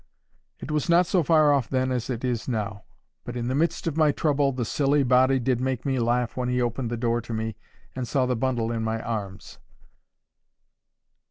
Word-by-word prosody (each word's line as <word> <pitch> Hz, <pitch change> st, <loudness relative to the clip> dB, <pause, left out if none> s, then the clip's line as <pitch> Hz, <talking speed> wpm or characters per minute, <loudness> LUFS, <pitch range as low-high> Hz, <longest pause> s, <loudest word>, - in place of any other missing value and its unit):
It 150 Hz, -, -7 dB
was 150 Hz, 0 st, -1 dB
not 175 Hz, +2 st, +5 dB
so 180 Hz, +1 st, +2 dB
far 155 Hz, -2 st, +4 dB
off 135 Hz, -4 st, 0 dB
then 130 Hz, -1 st, 0 dB
as 125 Hz, -1 st, -2 dB
it 125 Hz, 0 st, -3 dB
is 120 Hz, -3 st, -2 dB
now. 105 Hz, -4 st, -3 dB, 0.4 s
But 120 Hz, 0 st, -6 dB
in 120 Hz, 0 st, -2 dB
the -, -, 0 dB
midst 160 Hz, +5 st, 0 dB
of 160 Hz, -2 st, -2 dB
my 155 Hz, -2 st, +4 dB
trouble 145 Hz, -2 st, +1 dB
the 125 Hz, -2 st, -3 dB
silly 140 Hz, +3 st, +2 dB
body 130 Hz, +1 st, +4 dB
did 125 Hz, -1 st, 0 dB
make 130 Hz, -1 st, -2 dB
me 135 Hz, -2 st, 0 dB
laugh 120 Hz, 0 st, 0 dB
when 125 Hz, -1 st, -2 dB
he 125 Hz, 0 st, 0 dB
opened 120 Hz, 0 st, -1 dB
the 120 Hz, -, -3 dB
door 120 Hz, 0 st, 0 dB
to 115 Hz, 0 st, -7 dB
me, 110 Hz, -1 st, -3 dB, 0.4 s
and 130 Hz, -2 st, -3 dB
saw 130 Hz, +1 st, +1 dB
the 125 Hz, 0 st, 0 dB
bundle 115 Hz, -1 st, -1 dB
in 115 Hz, -1 st, -2 dB
my 110 Hz, 0 st, -1 dB
arms. 105 Hz, -4 st, -6 dB
125 Hz, 205 wpm, -25 LUFS, 115-135 Hz, 0.4 s, not